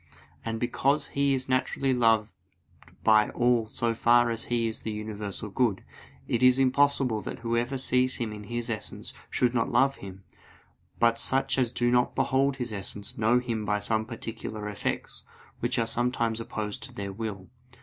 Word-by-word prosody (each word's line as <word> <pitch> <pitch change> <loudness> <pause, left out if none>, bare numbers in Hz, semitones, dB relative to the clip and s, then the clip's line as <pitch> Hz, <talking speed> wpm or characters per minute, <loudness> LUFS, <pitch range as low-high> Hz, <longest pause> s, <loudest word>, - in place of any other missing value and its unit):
And 115 0 -3
because 140 +4 +1
He 140 -1 +2
is 130 0 -3
naturally 130 +1 +1
loved 115 -5 +3 0.7
by 110 -1 +5
all 120 -2 +2
so 115 +1 -1
far 120 +1 +4
as 115 0 -2
He 120 -1 0
is 110 - -5
the - - -4
universal 105 -1 -5
good, 110 -4 +1 0.4
it 120 - 0
is 125 0 +6
impossible 135 -3 +2
that 125 +3 -7
whoever 120 +3 -1
sees 130 0 +1
Him 115 -3 -3
in 105 -1 -9
His 120 +1 -3
essence 115 -3 -4 0.2
should 125 -1 +1
not 115 -2 0
love 135 0 +3
Him. 95 0 -10 0.7
But 115 -1 +3
such 135 +2 +2
as 125 -3 +1
do 120 0 +1
not 125 0 +2
behold 135 +1 +2
His 125 -4 -4
essence, 100 0 -4
know 110 +3 +3
Him 120 -3 -2
by 105 0 +1
some 110 +1 -1
particular 115 -2 -6
effects, 105 -1 -4 0.4
which 120 +2 -1
are 115 - +2
sometimes 115 -1 0
opposed 110 -2 -4
to - - -10
their 100 -1 -5
will. 100 -3 -6
115 Hz, 170 wpm, -28 LUFS, 110-125 Hz, 0.7 s, is